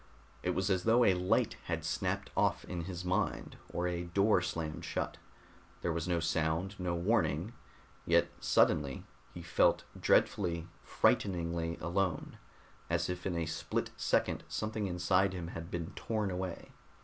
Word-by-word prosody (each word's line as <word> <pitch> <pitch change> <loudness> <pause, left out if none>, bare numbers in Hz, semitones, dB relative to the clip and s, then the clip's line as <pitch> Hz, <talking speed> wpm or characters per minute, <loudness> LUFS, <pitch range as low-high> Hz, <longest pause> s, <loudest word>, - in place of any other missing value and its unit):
It - - 0
was 95 +1 +1
as 95 -1 +1
though 115 +2 +5
a 95 - +6
light 90 0 +1
had - - -2
snapped - - -1
off - - +2
in 85 -2 -4
his 90 -1 -5
mind, 90 +1 -1
or 90 +1 -1
a 90 0 -2
door 100 +3 +3
slammed 80 -3 -3
shut. - - -3 0.7
There 85 - +1
was 85 +1 -2
no 85 -1 +1
sound, 80 +3 0
no 90 -1 -1
warning; 85 0 +1 0.5
yet, - - +4
suddenly, 70 -3 +2 0.3
he 85 - -8
felt 85 0 +3
dreadfully, 85 -4 +2
frighteningly 85 -3 +1
alone, 85 0 -1 0.5
as 85 +2 +1
if 90 +1 -4
in 90 - -1
a 85 - 0
split 80 0 -2
second - - +1
something 110 -1 -2
inside 90 +2 +2
him 85 -2 -5
had 85 0 -7
been 85 -2 -4
torn 105 -3 -2
away. 90 -1 -4
90 Hz, 150 wpm, -33 LUFS, 85-95 Hz, 0.7 s, a